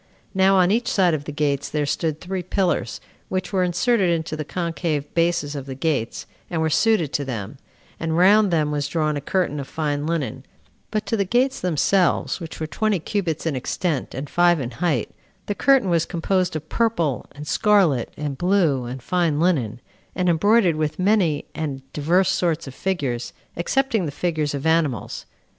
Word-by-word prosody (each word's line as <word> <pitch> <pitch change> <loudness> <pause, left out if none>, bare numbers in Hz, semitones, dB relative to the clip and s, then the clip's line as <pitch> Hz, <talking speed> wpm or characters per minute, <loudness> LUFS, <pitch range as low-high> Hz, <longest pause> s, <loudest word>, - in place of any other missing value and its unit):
Now 190 0 +4
on 185 0 +4
each 230 +3 +1
side 180 -4 +3
of 145 -2 -2
the 150 - -5
gates 145 -2 -1
there 150 -1 -1
stood 155 +1 -1
three 185 0 -4
pillars, 175 - -1 0.3
which 185 +1 -3
were 190 - +2
inserted 180 +3 +2
into 160 -2 -1
the 155 - -3
concave 165 -3 -3
bases 165 -4 +1
of 140 -1 -6
the 135 - -5
gates, 135 -5 -2 0.2
and 170 - -2
were 160 0 +1
suited 195 -5 +2
to 145 - 0
them; 125 0 -5 0.4
and 160 0 -1
round 200 +3 +6
them 155 -4 +1
was 145 -1 -1
drawn 155 -2 0
a 145 - -3
curtain 150 -1 -1
of 135 - -5
fine 150 -1 -2
linen; 155 -9 -2 0.5
but 215 0 -2
to 205 - 0
the 200 - +1
gates 245 +7 +1
themselves, 180 +3 +1
which 165 -3 -8
were 160 - -2
twenty 215 +6 0
cubits 170 -3 -2
in 160 -4 0
extent, 145 +3 -2
and 135 +3 -4
five 175 +1 +3
in 125 -2 -4
height, 150 -3 -1 0.3
the 205 - -1
curtain 270 0 +3
was 170 -1 +2
composed 180 0 0
of 155 0 -5
purple, 175 - 0
and 145 +1 -9
scarlet, 175 - +3
and 145 -3 -4
blue, 175 -9 +2
and 125 +1 -7
fine 170 -3 +1
linen, 140 - +1 0.4
and 180 -1 +1
embroidered 180 0 +3
with 155 -1 -1
many 185 -6 +2
and 140 -4 -4
divers 170 +6 +2
sorts 170 -4 0
of 135 - -8
figures, 135 -10 -2 0.2
excepting 225 - 0
the - - -3
figures 155 -1 -1
of 140 - -5
animals. 160 -8 0
165 Hz, 185 wpm, -22 LUFS, 145-185 Hz, 0.5 s, round